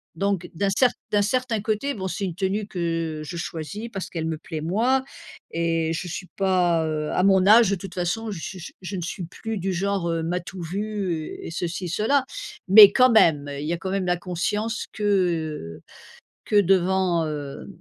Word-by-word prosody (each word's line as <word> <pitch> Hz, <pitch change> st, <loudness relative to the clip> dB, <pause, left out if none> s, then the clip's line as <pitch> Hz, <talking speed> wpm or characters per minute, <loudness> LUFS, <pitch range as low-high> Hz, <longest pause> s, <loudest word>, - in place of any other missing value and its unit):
Donc, 195 Hz, 0 st, -1 dB
d'un 195 Hz, +3 st, +1 dB
cert 255 Hz, +2 st, +5 dB, 0.2 s
d'un 205 Hz, -1 st, +3 dB
certain 235 Hz, 0 st, 0 dB
côté, 220 Hz, +7 st, -1 dB
bon, 190 Hz, -5 st, -4 dB
c'est 190 Hz, +3 st, -4 dB
une 180 Hz, -, -3 dB
tenue 195 Hz, +4 st, -1 dB
que 165 Hz, -4 st, -3 dB
je 155 Hz, +3 st, -6 dB
choisis 170 Hz, +6 st, -5 dB
parce 195 Hz, -2 st, -5 dB
qu'elle 165 Hz, -2 st, -4 dB
me 160 Hz, -1 st, -3 dB
plaît, 160 Hz, -3 st, -6 dB
moi 235 Hz, +11 st, +1 dB, 0.5 s
et 165 Hz, -1 st, 0 dB
je 170 Hz, +2 st, -4 dB
suis 180 Hz, +2 st, -6 dB
pas, 180 Hz, -4 st, +2 dB
heu 155 Hz, -1 st, -2 dB
à -, -, +1 dB
mon 190 Hz, -1 st, +4 dB
âge, 220 Hz, 0 st, +7 dB
de 200 Hz, -, +1 dB
toute 190 Hz, 0 st, -9 dB
façon, 210 Hz, +5 st, -2 dB
je 190 Hz, -, -5 dB
suis 180 Hz, +1 st, -7 dB
je 185 Hz, +2 st, -5 dB
ne 180 Hz, -, -3 dB
suis 175 Hz, +1 st, -5 dB
plus 220 Hz, +5 st, -5 dB
du 190 Hz, +1 st, -1 dB
genre, 190 Hz, -1 st, -1 dB
heu, 165 Hz, -1 st, -1 dB
m'as-tu 180 Hz, +3 st, -4 dB
vu 190 Hz, -3 st, -3 dB
et -, -, -7 dB
ceci, 175 Hz, +1 st, -3 dB
cela, 230 Hz, -, +1 dB, 0.4 s
mais 200 Hz, +1 st, +10 dB
quand 255 Hz, +2 st, +5 dB
même, 160 Hz, -10 st, +4 dB
il 145 Hz, -, -4 dB
y 170 Hz, -, 0 dB
a 175 Hz, -, -1 dB
quand 190 Hz, +2 st, -5 dB
même 195 Hz, -1 st, -1 dB
la 180 Hz, 0 st, +2 dB
conscience 205 Hz, +6 st, -2 dB
que, 210 Hz, -, -6 dB
heu, 165 Hz, -, 0 dB, 0.6 s
que -, -, -2 dB
devant, 185 Hz, -2 st, +2 dB
heu 145 Hz, -2 st, -6 dB
185 Hz, 195 wpm, -24 LUFS, 165-205 Hz, 0.6 s, mais